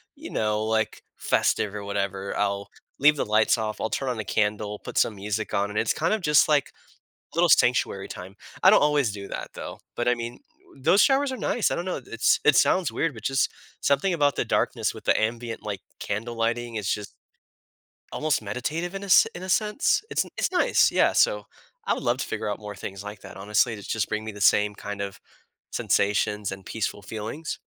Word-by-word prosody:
you - - -9
know, 105 0 0
like, 110 0 -1
festive 105 -1 +1
or 100 - -5
whatever, 100 -1 -3
I'll 100 -1 -1 0.3
leave 150 +2 +6
the - - -1
lights 110 +2 +3
off. 110 -1 -3
I'll 110 - -1
turn 135 -2 -2
on 120 - -2
the 110 - -4
candle, 105 0 -1
put - - -8
some 110 - +2
music 105 +2 -3
on, 100 +1 +1
and 105 - -1
it's - - +1
kinda 210 +7 0
just, 150 -2 +4
like, 145 -2 +2 0.6
little - - +3
sanctuary - - +3
time. 95 +2 -9 0.3
I 190 - +9
don't 210 - +6
always 145 -6 +3
do 100 -1 -7
that, - - -6
though, - - -8 0.2
but, 120 - -1
I 125 - +4
mean, 120 +1 -6 0.4
those 185 +9 +4
showers 275 0 +3
are - - -5
nice. 240 - 0
I - - -1
don't 170 - -3
know. 185 - -2
It's 115 +1 +2
it 150 - +6
sounds 185 +6 +3
weird, 165 -4 0
but 110 - -11
just 135 +1 +1 0.3
something 140 +7 +2
about 145 -4 +2
the - - 0
darkness - - 0
with - - -11
the - - +3
ambient, 115 +1 -2
like, 100 -3 -4 0.2
candle 115 +4 -4
lighting, 115 0 -1
it's 105 -2 0
just 105 -1 -5 1.0
almost 155 -4 0
meditative 150 - -3
in 195 - -5
a 200 - -7 0.2
in 175 - -8
a - - -5
sense. 210 - +2
It's - - 0
n - - -14
it's - - 0
nice, 360 - +3
yeah. - - +3
So, - - +3 0.4
I - - +2
would - - -5
love 120 0 +1
to - - -3
figure 110 -1 -3
out 105 - -3
more 105 -1 -8
things 95 0 -7
like 105 0 -8
that, - - -11
honestly. 105 +4 +1
It's 105 -2 -9
just 110 -2 -1
bringing 110 +1 -2
me 110 - -5
the 105 - -10
same 105 +1 +4
kind 105 -1 -6
of 100 -1 -5 0.5
sensations 105 0 +1
and 95 -1 -8
peaceful 105 -2 -3
feelings. 110 +10 -5
110 Hz, 210 wpm, -25 LUFS, 105-145 Hz, 1.0 s, I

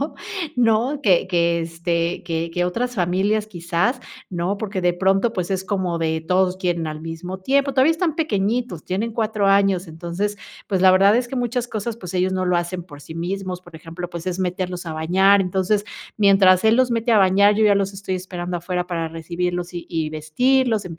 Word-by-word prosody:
complicado, 285 - -3 0.4
¿no?, 240 +4 +2
que 185 -6 +3
que, 170 -2 +1
este, 170 +1 -2
que 165 0 -2
que 175 +1 0
otras 245 +7 -2
familias 195 +3 0
quizás, 175 +6 -1 0.3
¿no?, 180 +3 -2
porque 205 -3 -3
de 175 0 +3
pronto, 195 +5 +1
pues 185 -4 -3
es 190 -1 -1
como 185 -4 -1
de 160 -1 -1
todos 180 +2 +1
quieren 175 -3 -1
al 155 0 -5
mismo 165 +3 -6
tiempo. 275 +7 +1
Todavía 265 +4 +4
están 325 -1 0
pequeñitos, 230 - -1
tienen 215 +5 -2
4 215 -2 0
años, 195 -2 +3
entonces, 175 +6 -3 0.3
pues 190 -3 0
la 185 - +8
verdad 195 +3 +5
es 245 0 0
que 260 - -6
muchas 245 0 -1
cosas, 220 +1 -4
pues 180 -6 -8
ellos 185 +1 +1
no 185 - -1
lo 180 -1 +2
hacen 175 +1 -3
por 145 -5 -13
sí 160 - -10
mismos, 180 +2 -4
por 175 -2 -17
ejemplo, 165 +2 -7
pues 170 0 -7
es 185 0 -2
meterlos 180 -1 -3
a 160 - -4
bañar, 190 +5 +3
entonces 190 +3 0 0.3
mientras 195 -2 +5
él 220 +1 +5
los 255 -1 +3
mete 230 0 +1
a 215 - +6
bañar, 200 +2 +5
yo 220 - +3
ya 205 -1 +5
los 200 0 0
estoy 195 -1 -4
esperando 180 -1 -4
afuera 180 +1 -3
para 165 -2 -2
recibirlos 175 +2 -3
y 175 - -3
y 160 -2 -2
vestirlos, 220 - +1
185 Hz, 200 wpm, -21 LUFS, 175-210 Hz, 0.4 s, la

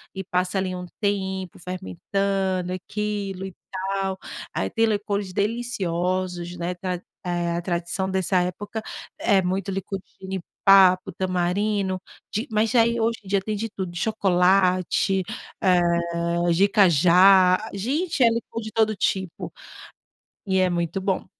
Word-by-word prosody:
e 190 - -4
passa 180 +1 -1
ali 190 -1 -1
um 180 0 -5 0.2
tempo 190 -3 -2
fermentando 185 - -2
aquilo, 200 0 -3
e 190 - -7 0.2
tal. 190 0 -2 0.4
Ai, - - -1
tem 225 -1 +2
licores 205 -3 -1
deliciosos, 185 -5 -2
né, 170 +1 -2
tra 180 0 -4 0.2
eh, 175 -1 -1
a - - -2
tradição 175 +2 -2
dessa 190 0 +1
época, 205 +5 -4 0.4
é 195 -1 +3
muito 190 +2 -2
licor 195 0 -4
de 190 - -25
jenipapo, 190 0 +3
tamarindo, 185 +2 -1 0.3
de 220 +7 -2
mas 215 0 +1
já 235 - +5
aí 235 +1 +1
hoje 230 0 0
em - - -12
dia 195 0 +1
tem 210 +2 -3
de 225 +2 -3
tudo, 190 -4 -5
de 175 - -6
chocolate, 185 -2 +2 0.4
eh, 170 -1 +2
de 190 +4 +5
cajá. 185 0 +6 0.2
Gente, 275 - 0
é 235 - +7
licor 230 0 -3
de 220 0 -7
todo 220 -1 +2
tipo. 190 -3 -2 1.0
E 190 -1 +2
é 185 -1 +3
muito 170 +1 -1
bom. 190 -1 -1
190 Hz, 145 wpm, -24 LUFS, 180-200 Hz, 1.0 s, é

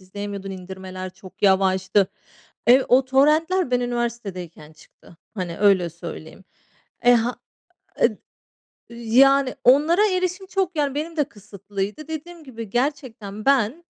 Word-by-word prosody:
izleyemiyordun, 200 +1 -7
indirmeler 185 0 -8
çok 185 +1 -16
yavaştı. 190 0 +3 0.6
Ev 255 +3 +6
O 260 +2 +5
torrentler 305 +6 +2
ben 250 0 +2
üniversitedeyken 210 -10 -4
çıktı. 155 +2 -20 0.2
Hani, 180 -5 -5
öyle 195 -4 +3
söyleyeyim. 165 +2 -10 0.6
E, 245 0 +6
ha 235 +1 0 0.6
ed - - +2 0.7
yani, 255 +3 +3
onlara 310 - +5
erişim 370 +1 -2
çok, 375 -3 -1
yani, 285 -2 0
benim 320 +3 -4
de 300 - +3
kısıtlıydı. 205 +2 -7
Dediğim 320 +2 -7
gibi 230 -6 -9
gerçekten 230 -5 -3
ben 275 +4 +2
235 Hz, 120 wpm, -22 LUFS, 190-285 Hz, 0.7 s, Ev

